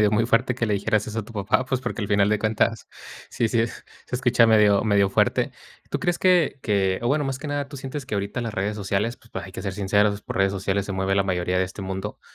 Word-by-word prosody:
medio 105 Hz, -1 st, +4 dB
muy 115 Hz, +2 st, +2 dB
fuerte 120 Hz, +1 st, +2 dB
que 120 Hz, -, -1 dB
le 105 Hz, -2 st, +1 dB
dijeras 105 Hz, +1 st, 0 dB
eso 110 Hz, +1 st, -4 dB
a 110 Hz, -, -3 dB
tu 115 Hz, -, -13 dB
papá, 105 Hz, +4 st, +1 dB
pues 130 Hz, -1 st, -1 dB
porque 120 Hz, -2 st, -4 dB
al 105 Hz, -, -2 dB
final 100 Hz, 0 st, +3 dB
de 105 Hz, 0 st, +2 dB
cuentas 110 Hz, 0 st, 0 dB, 0.4 s
sí, 115 Hz, -, 0 dB
sí 115 Hz, -, +1 dB
es 115 Hz, -, -5 dB, 0.2 s
se -, -, -6 dB
escucha 120 Hz, -2 st, +4 dB
medio, 105 Hz, -2 st, +4 dB
medio 100 Hz, -2 st, +3 dB
fuerte. -, -, +2 dB, 0.4 s
¿Tú -, -, -1 dB
crees 175 Hz, -1 st, 0 dB
que, 175 Hz, -7 st, +3 dB
que, 95 Hz, -3 st, +1 dB
o 120 Hz, -, 0 dB
bueno, 145 Hz, +2 st, +1 dB
más 135 Hz, -1 st, -3 dB
que 150 Hz, -, -5 dB
nada, 145 Hz, -1 st, -2 dB
tú 140 Hz, -, -9 dB
sientes 135 Hz, +1 st, -6 dB
que 120 Hz, -, -4 dB
ahorita 100 Hz, +4 st, -2 dB
las 115 Hz, -2 st, -4 dB
redes 105 Hz, 0 st, -1 dB
sociales, 105 Hz, +3 st, -1 dB
pues 115 Hz, -, -23 dB
hay 95 Hz, -, -10 dB
que -, -, -7 dB
ser 95 Hz, -, -3 dB
sinceros, 100 Hz, +1 st, +1 dB
por -, -, -6 dB
redes 95 Hz, 0 st, +2 dB
sociales 100 Hz, 0 st, -1 dB
se 100 Hz, -, -4 dB
mueve 95 Hz, +1 st, 0 dB
la 100 Hz, -, +3 dB
mayoría 90 Hz, -1 st, 0 dB
de 95 Hz, -, +2 dB
este 95 Hz, +2 st, -8 dB
mundo, 95 Hz, +2 st, -5 dB
105 Hz, 265 wpm, -24 LUFS, 100-120 Hz, 0.4 s, medio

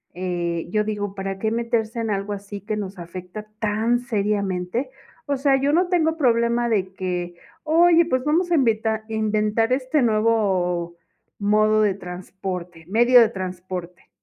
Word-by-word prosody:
eh, 175 Hz, -2 st, -2 dB
yo 215 Hz, +1 st, +2 dB
digo: 205 Hz, -2 st, -3 dB
"¿Para 195 Hz, 0 st, -4 dB
qué 220 Hz, +2 st, 0 dB
meterse 230 Hz, -1 st, -1 dB
en 225 Hz, -, -2 dB
algo 200 Hz, 0 st, -2 dB
así 200 Hz, 0 st, -7 dB
que 215 Hz, +1 st, -3 dB
nos 195 Hz, -2 st, -5 dB
afecta 180 Hz, +4 st, -8 dB
tan 225 Hz, +2 st, +1 dB
seriamente?", 205 Hz, -1 st, -1 dB, 0.4 s
o 280 Hz, -1 st, 0 dB
sea, 270 Hz, 0 st, +3 dB
yo 285 Hz, +2 st, +2 dB
no 355 Hz, +2 st, +2 dB
tengo 325 Hz, -3 st, +1 dB
problema 235 Hz, -3 st, +2 dB
de 190 Hz, -4 st, 0 dB
que: 180 Hz, -2 st, -3 dB, 0.3 s
"Oye, 335 Hz, +2 st, +5 dB
pues 255 Hz, -6 st, 0 dB
vamos 340 Hz, +4 st, +1 dB
a -, -, +5 dB
invitar 220 Hz, -5 st, +1 dB
inventar 215 Hz, +1 st, +1 dB
este 265 Hz, +3 st, +1 dB
nuevo 195 Hz, -7 st, +1 dB, 0.4 s
modo 215 Hz, +1 st, +3 dB
de 205 Hz, -2 st, +2 dB
transporte, 180 Hz, -2 st, -7 dB
medio 240 Hz, +5 st, +5 dB
de 225 Hz, -, +4 dB
transporte". 180 Hz, -3 st, -7 dB
215 Hz, 150 wpm, -23 LUFS, 185-240 Hz, 0.4 s, Oye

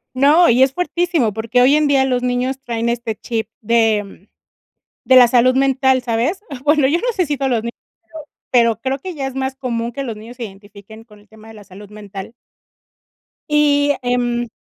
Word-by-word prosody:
No, 295 Hz, +7 st, +5 dB
y 245 Hz, +2 st, +3 dB
es 265 Hz, 0 st, +4 dB
fuertísimo, 350 Hz, -, -1 dB
porque 230 Hz, +4 st, -1 dB
hoy 270 Hz, +3 st, +5 dB
en 300 Hz, -1 st, +2 dB
día 270 Hz, -2 st, +3 dB
los 250 Hz, -2 st, 0 dB
niños 250 Hz, +1 st, -2 dB
traen 235 Hz, -1 st, -3 dB
este 235 Hz, -2 st, -3 dB
chip 225 Hz, -1 st, -4 dB
de 220 Hz, -3 st, 0 dB, 0.8 s
de 260 Hz, -, +4 dB
la 250 Hz, -1 st, +8 dB
salud 255 Hz, +1 st, +3 dB
mental, 265 Hz, -1 st, +2 dB
¿sabes? 240 Hz, -, -1 dB, 0.2 s
Bueno, 295 Hz, -2 st, +3 dB
yo 320 Hz, +5 st, +1 dB
no -, -, -1 dB
sé 365 Hz, -, +1 dB
si 295 Hz, -1 st, -2 dB
todos 270 Hz, 0 st, -1 dB
los 230 Hz, -, +1 dB
niños, 235 Hz, 0 st, -5 dB, 0.4 s
pero 320 Hz, -1 st, -8 dB, 0.3 s
pero 230 Hz, -3 st, +3 dB
creo 265 Hz, +1 st, -2 dB
que 365 Hz, +6 st, -7 dB
ya 275 Hz, -, -4 dB
es 265 Hz, -, -7 dB
más 265 Hz, 0 st, -3 dB
común 240 Hz, -3 st, -3 dB
que 275 Hz, +3 st, -5 dB
los 230 Hz, -4 st, -5 dB
niños 230 Hz, +3 st, -12 dB
se 245 Hz, -, -6 dB
identifiquen 205 Hz, +2 st, -14 dB
con 210 Hz, -3 st, -19 dB
el 205 Hz, -, -24 dB
tema 220 Hz, 0 st, -16 dB
de 225 Hz, -, -12 dB
la 210 Hz, -, -13 dB
salud 200 Hz, +1 st, -14 dB
mental. 205 Hz, -1 st, -9 dB, 1.2 s
Y, 290 Hz, -1 st, +3 dB
em, 245 Hz, -1 st, -1 dB
245 Hz, 200 wpm, -18 LUFS, 225-275 Hz, 1.2 s, la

